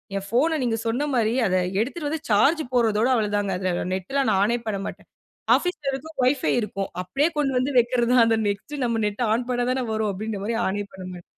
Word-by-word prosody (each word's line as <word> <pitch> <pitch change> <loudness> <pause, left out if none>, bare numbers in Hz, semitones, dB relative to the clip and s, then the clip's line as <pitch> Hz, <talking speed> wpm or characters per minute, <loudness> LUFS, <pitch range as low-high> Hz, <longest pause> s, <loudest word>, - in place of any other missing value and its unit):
என் 195 0 -3
ஃபோன 310 +7 +2
நீங்க 230 -2 0
சொன்னமாரி 240 -2 +1
அத 185 - +1 0.2
எடுத்துட்டு 290 +7 -2
வந்து 315 0 -3
சார்ஜ் 280 +10 +4
போடுறதோட 225 -2 +3
அவ்ளதாங்க. 205 -3 0
அதில 185 -1 -1
நெட் 190 +7 -7
லாம் 275 -4 +2
நான் 195 -1 +2
ஆனே 235 +3 +1
பண்ண 205 -2 -1
மாட்டேன். - - -9 0.5
ஆஃபீஸ் 360 -3 -2
ல - - +1
இருக்கும், 315 +4 -7
ஒய்ஃபை 260 +1 +2
இருக்கும். 195 -2 -4
அப்பிடியே 275 - +1
கொண்டு 270 -3 +1
வந்து 260 +3 0
வைக்கிறத 240 0 +1
தான். 245 -2 +6
அந்த 225 -1 +3
நெக்ஸ்ட்டு 255 +8 -3
நம்ம 230 -2 0
நெட் 210 +4 -3
ஆன் 240 +2 -1
பண்ண 245 0 0
தானே 260 0 -1
வரும். 215 -1 0
அப்பிடின்றமாரி 210 +2 -3
ஆனே 205 +2 -1
பண்ண 190 -1 -9
மாட்டேன். 175 -1 -10
230 Hz, 205 wpm, -24 LUFS, 205-265 Hz, 0.5 s, தான்